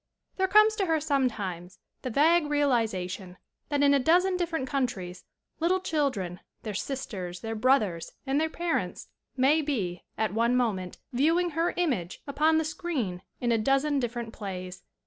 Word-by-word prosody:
There 380 Hz, 0 st, +2 dB
comes 430 Hz, +2 st, +6 dB
to 390 Hz, -3 st, 0 dB
her 320 Hz, -1 st, +2 dB
sometimes 215 Hz, -, -1 dB, 0.2 s
the 255 Hz, -, -3 dB
vague 305 Hz, +5 st, +4 dB
re 295 Hz, 0 st, +2 dB
alization 190 Hz, -8 st, -1 dB, 0.3 s
that 290 Hz, -1 st, +1 dB
in 285 Hz, 0 st, +6 dB
a 280 Hz, -, +4 dB
dozen 360 Hz, +7 st, +3 dB
different 330 Hz, -6 st, -1 dB
countries 235 Hz, -10 st, -3 dB, 0.3 s
little 355 Hz, +3 st, +2 dB
children, 260 Hz, -, -1 dB, 0.2 s
their 215 Hz, -2 st, -4 dB
sisters, 190 Hz, -7 st, -4 dB
their 225 Hz, 0 st, -3 dB
brothers 215 Hz, -8 st, +1 dB
and 275 Hz, +2 st, +1 dB
their 320 Hz, -, +1 dB
parents 340 Hz, +1 st, -2 dB, 0.3 s
may 280 Hz, +5 st, +4 dB
be, 205 Hz, -, -2 dB, 0.2 s
at 215 Hz, -2 st, 0 dB
one 235 Hz, +3 st, +2 dB
moment, 195 Hz, -7 st, -1 dB, 0.2 s
viewing 330 Hz, +7 st, +2 dB
her 330 Hz, +3 st, 0 dB
image 250 Hz, -, -1 dB
upon 310 Hz, +3 st, +2 dB
the 320 Hz, -, +1 dB
screen 280 Hz, -, -3 dB, 0.2 s
in 240 Hz, -1 st, 0 dB
a 230 Hz, -, +3 dB
dozen 275 Hz, +4 st, +2 dB
different 240 Hz, -2 st, -3 dB
plays. 185 Hz, -3 st, -6 dB
265 Hz, 160 wpm, -28 LUFS, 200-315 Hz, 0.3 s, comes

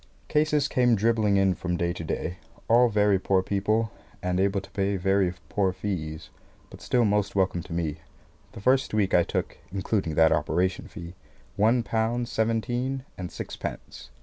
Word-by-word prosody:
Cases 150 Hz, -1 st, +2 dB
came 125 Hz, -4 st, +3 dB
dribbling 110 Hz, -1 st, +2 dB
in 95 Hz, -1 st, +3 dB
from 90 Hz, 0 st, -3 dB
day 85 Hz, +1 st, 0 dB
to 85 Hz, -, -6 dB
day 85 Hz, +2 st, -3 dB, 0.3 s
all 120 Hz, +1 st, +5 dB
very 105 Hz, -2 st, +3 dB
poor 95 Hz, 0 st, +2 dB
people, 105 Hz, +3 st, 0 dB, 0.3 s
and 90 Hz, 0 st, 0 dB
able 100 Hz, +1 st, +2 dB
to 95 Hz, -, -13 dB
pay 100 Hz, 0 st, 0 dB
very 95 Hz, 0 st, +2 dB, 0.2 s
poor 95 Hz, +5 st, +1 dB
fees 80 Hz, -5 st, -5 dB, 0.4 s
but -, -, -12 dB
still 120 Hz, -2 st, +2 dB
most 105 Hz, -1 st, +1 dB
welcome 95 Hz, -2 st, +1 dB
to 90 Hz, -, -13 dB
me. 80 Hz, -2 st, -2 dB, 0.6 s
The -, -, -9 dB
first 130 Hz, 0 st, +2 dB
week 100 Hz, -3 st, +1 dB
I 90 Hz, -, +6 dB
took -, -, -3 dB
(including 95 Hz, -4 st, -1 dB
that 80 Hz, 0 st, +5 dB
operation 90 Hz, +4 st, 0 dB
fee) 85 Hz, 0 st, -9 dB, 0.4 s
one 115 Hz, +4 st, +3 dB
pound 115 Hz, +2 st, -1 dB
seventeen 120 Hz, +4 st, -1 dB
and 90 Hz, -1 st, -6 dB
sixpence. -, -, -7 dB
100 Hz, 165 wpm, -26 LUFS, 90-115 Hz, 0.6 s, I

